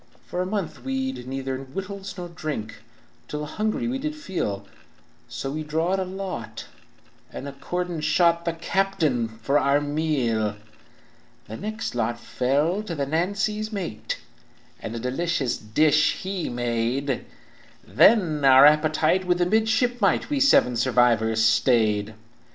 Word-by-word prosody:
"For 180 Hz, -, -3 dB
a 185 Hz, -, -2 dB
month 195 Hz, -4 st, -4 dB
we'd 265 Hz, -, -3 dB
neither 135 Hz, 0 st, -4 dB
wittles 195 Hz, +9 st, -7 dB
nor 175 Hz, -1 st, -5 dB
drink, 145 Hz, -10 st, -5 dB, 0.5 s
Till 150 Hz, 0 st, -4 dB
a -, -, -3 dB
hungry 215 Hz, +9 st, -2 dB
we 260 Hz, +2 st, -2 dB
did 305 Hz, +2 st, -3 dB
feel, 170 Hz, -, -4 dB, 0.6 s
So 135 Hz, -, -4 dB
we 155 Hz, +2 st, -3 dB
drawed 160 Hz, +5 st, 0 dB
a 190 Hz, -, -1 dB
lot, 185 Hz, -10 st, -6 dB, 0.7 s
and 140 Hz, -, -7 dB
accordin' 175 Hz, +4 st, -4 dB
shot 170 Hz, +2 st, +3 dB
The 170 Hz, -, -1 dB
captain 165 Hz, -, 0 dB
for 115 Hz, +6 st, 0 dB
our 140 Hz, +1 st, +3 dB
meal. 140 Hz, -8 st, 0 dB, 0.9 s
"The 110 Hz, -, -7 dB
next 215 Hz, -, -4 dB
lot 120 Hz, 0 st, -1 dB
fell 145 Hz, -, 0 dB
to 185 Hz, -6 st, -5 dB
the 140 Hz, -2 st, -1 dB
Nancy's 200 Hz, +8 st, -1 dB
mate, 180 Hz, -, -4 dB, 0.6 s
And 115 Hz, -, -6 dB
a -, -, -3 dB
delicate 130 Hz, -4 st, -2 dB
dish 155 Hz, 0 st, +4 dB
he 190 Hz, -2 st, -3 dB
made; 120 Hz, +3 st, -1 dB, 0.6 s
Then 155 Hz, -, +4 dB
our 135 Hz, 0 st, +8 dB
appetite 155 Hz, +4 st, +3 dB
with 180 Hz, -1 st, +2 dB
the 175 Hz, -, +2 dB
midshipmite 220 Hz, +3 st, +1 dB
We 285 Hz, -, +1 dB
seven 275 Hz, -, +4 dB
survivors 115 Hz, -3 st, +3 dB
stayed. 110 Hz, -2 st, +2 dB
155 Hz, 135 wpm, -24 LUFS, 125-190 Hz, 0.9 s, our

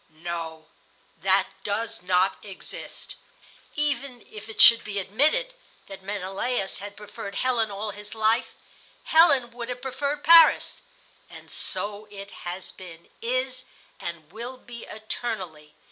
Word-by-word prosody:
"No, 165 Hz, -2 st, -5 dB, 0.5 s
that 190 Hz, +1 st, +4 dB, 0.2 s
does 210 Hz, +1 st, -2 dB
not 185 Hz, +1 st, +2 dB
exist. 195 Hz, -3 st, -8 dB, 0.6 s
Even 280 Hz, -4 st, -2 dB
if 215 Hz, +1 st, -10 dB
it 220 Hz, -, -9 dB
should 230 Hz, -1 st, +9 dB
be 205 Hz, -1 st, -4 dB
admitted 295 Hz, -, +2 dB, 0.3 s
that 195 Hz, 0 st, -10 dB
Menelaus 195 Hz, +2 st, -2 dB
had 205 Hz, +1 st, -8 dB
preferred 205 Hz, -1 st, -8 dB
Helen 240 Hz, -4 st, +2 dB
all 205 Hz, +1 st, -4 dB
his 210 Hz, +2 st, -8 dB
life, 220 Hz, +3 st, +2 dB, 0.6 s
Helen 285 Hz, -7 st, +5 dB
would 235 Hz, 0 st, -6 dB
have 250 Hz, 0 st, -5 dB
preferred 280 Hz, +3 st, -2 dB
Paris; 330 Hz, 0 st, +7 dB, 0.5 s
and -, -, -13 dB
so 210 Hz, +1 st, -1 dB
it 200 Hz, -1 st, -9 dB, 0.2 s
has 180 Hz, +2 st, -5 dB
been, 170 Hz, -3 st, -12 dB
is, 255 Hz, +2 st, -1 dB, 0.3 s
and 170 Hz, -2 st, -7 dB
will 240 Hz, +5 st, -6 dB
be 240 Hz, -2 st, -10 dB
eternally. 195 Hz, -9 st, -5 dB
215 Hz, 130 wpm, -26 LUFS, 195-250 Hz, 0.6 s, should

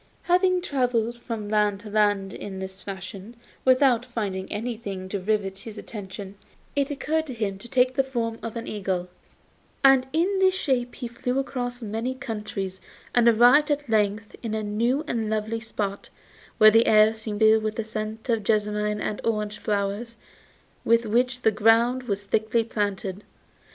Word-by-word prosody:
Having 365 Hz, +1 st, +3 dB
travelled 245 Hz, -5 st, 0 dB
from 225 Hz, -3 st, -5 dB
land 210 Hz, -1 st, +1 dB
to 215 Hz, -, -9 dB
land 205 Hz, -2 st, +2 dB
in 195 Hz, -2 st, -7 dB
this 190 Hz, 0 st, -7 dB
fashion 195 Hz, +3 st, -8 dB, 0.3 s
without 255 Hz, -2 st, +4 dB
finding 205 Hz, -6 st, -4 dB
anything 210 Hz, -4 st, -4 dB
to 200 Hz, -, -2 dB
rivet 195 Hz, -1 st, -1 dB
his 215 Hz, +1 st, -9 dB
attention, 200 Hz, -2 st, -8 dB, 0.4 s
it 280 Hz, -1 st, +1 dB
occurred 315 Hz, +2 st, -1 dB
to 260 Hz, -, -6 dB
him 200 Hz, -4 st, -2 dB
to 240 Hz, -, -11 dB
take 255 Hz, +1 st, +3 dB
the 270 Hz, 0 st, +2 dB
form 235 Hz, -4 st, -3 dB
of 230 Hz, 0 st, -6 dB
an 230 Hz, 0 st, -4 dB
eagle, 185 Hz, -3 st, -3 dB, 0.7 s
and 270 Hz, -1 st, +6 dB
in 365 Hz, +6 st, +1 dB
this 375 Hz, -1 st, +4 dB
shape 255 Hz, -8 st, -1 dB
he 245 Hz, -, -5 dB
flew 250 Hz, +2 st, -3 dB
across 245 Hz, -2 st, -3 dB
many 225 Hz, +4 st, -3 dB
countries 210 Hz, -6 st, -5 dB, 0.3 s
and 240 Hz, -1 st, +4 dB
arrived 245 Hz, +6 st, +6 dB
at 290 Hz, -2 st, -1 dB
length 210 Hz, -1 st, 0 dB
in 220 Hz, -2 st, -3 dB
a 215 Hz, -, -2 dB
new 235 Hz, +7 st, 0 dB
and 225 Hz, -6 st, -2 dB
lovely 220 Hz, +1 st, -1 dB
spot, 205 Hz, -2 st, -4 dB, 0.5 s
where 215 Hz, 0 st, +8 dB
the 225 Hz, +2 st, +4 dB
air 215 Hz, 0 st, +6 dB
seemed 220 Hz, -2 st, -5 dB
filled 220 Hz, 0 st, +6 dB
with 215 Hz, 0 st, -2 dB
the 225 Hz, -, -2 dB
scent 215 Hz, +1 st, -5 dB
of 230 Hz, -3 st, +1 dB
jessamine 210 Hz, 0 st, 0 dB
and 210 Hz, -, -3 dB
orange 210 Hz, -2 st, -1 dB
flowers 205 Hz, +3 st, -2 dB, 0.7 s
with 230 Hz, 0 st, +3 dB
which 250 Hz, +3 st, +1 dB
the 220 Hz, -, +5 dB
ground 230 Hz, +4 st, +3 dB
was 200 Hz, -2 st, -2 dB
thickly 220 Hz, +3 st, +1 dB
planted. 205 Hz, -2 st, -3 dB
220 Hz, 165 wpm, -25 LUFS, 205-245 Hz, 0.7 s, where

